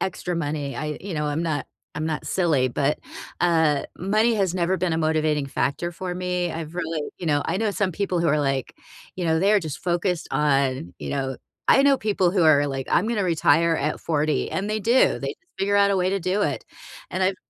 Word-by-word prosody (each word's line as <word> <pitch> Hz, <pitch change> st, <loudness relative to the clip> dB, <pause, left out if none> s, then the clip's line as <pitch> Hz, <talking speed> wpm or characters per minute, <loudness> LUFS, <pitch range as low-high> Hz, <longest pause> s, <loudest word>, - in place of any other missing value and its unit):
extra 180 Hz, -1 st, -3 dB
money, 145 Hz, -3 st, -3 dB
I 150 Hz, -1 st, -3 dB
you 195 Hz, -1 st, -6 dB
know, 150 Hz, 0 st, -1 dB
I'm 150 Hz, +3 st, -1 dB
not 155 Hz, -3 st, -2 dB, 0.3 s
I'm 155 Hz, +1 st, -2 dB
not 155 Hz, -2 st, -3 dB
silly, 155 Hz, -9 st, +2 dB
but, 140 Hz, +4 st, 0 dB, 0.4 s
uh, 160 Hz, -4 st, +3 dB, 0.2 s
money 215 Hz, +5 st, +2 dB
has 190 Hz, -3 st, +1 dB
never 180 Hz, +1 st, +1 dB
been 180 Hz, -2 st, -1 dB
a -, -, +1 dB
motivating 155 Hz, -2 st, +1 dB
factor 140 Hz, +5 st, -1 dB
for 180 Hz, +1 st, -5 dB
me, 180 Hz, -1 st, -1 dB
I've 160 Hz, 0 st, -6 dB
really 165 Hz, -3 st, -2 dB, 0.2 s
you 175 Hz, -, -5 dB
know, 145 Hz, -1 st, +2 dB
I -, -, 0 dB
know 215 Hz, 0 st, 0 dB
some 195 Hz, -2 st, 0 dB
people 185 Hz, -2 st, -1 dB
who 170 Hz, -, +2 dB
are 150 Hz, +1 st, +2 dB
like, 135 Hz, -2 st, -1 dB, 0.4 s
you 180 Hz, -, -3 dB
know, 160 Hz, 0 st, +2 dB
they're 205 Hz, +1 st, +4 dB
just 155 Hz, -5 st, -6 dB
focused 175 Hz, -1 st, -1 dB
on, 135 Hz, -, +1 dB
you -, -, -5 dB
know 135 Hz, -2 st, -2 dB, 0.3 s
I 270 Hz, -, +6 dB
know 280 Hz, -1 st, +5 dB
people 195 Hz, -4 st, +1 dB
who 185 Hz, -4 st, +2 dB
are 145 Hz, -2 st, +5 dB
like, 135 Hz, -2 st, -4 dB
"I'm 205 Hz, -, +3 dB
gonna 225 Hz, -3 st, 0 dB
retire 165 Hz, -1 st, +3 dB
at 150 Hz, +2 st, -2 dB
40," 155 Hz, -2 st, 0 dB
and 200 Hz, +2 st, -2 dB
they 215 Hz, 0 st, -1 dB
do, 235 Hz, +5 st, +3 dB
they -, -, -3 dB
just 390 Hz, -, -10 dB
figure 200 Hz, +1 st, +1 dB
out 200 Hz, 0 st, +4 dB
a -, -, +1 dB
way 185 Hz, 0 st, +1 dB
to 195 Hz, -, 0 dB
do 185 Hz, +3 st, 0 dB
it. -, -, -1 dB, 0.5 s
And 190 Hz, -, -1 dB
I've 185 Hz, 0 st, +2 dB
170 Hz, 225 wpm, -24 LUFS, 150-190 Hz, 0.5 s, I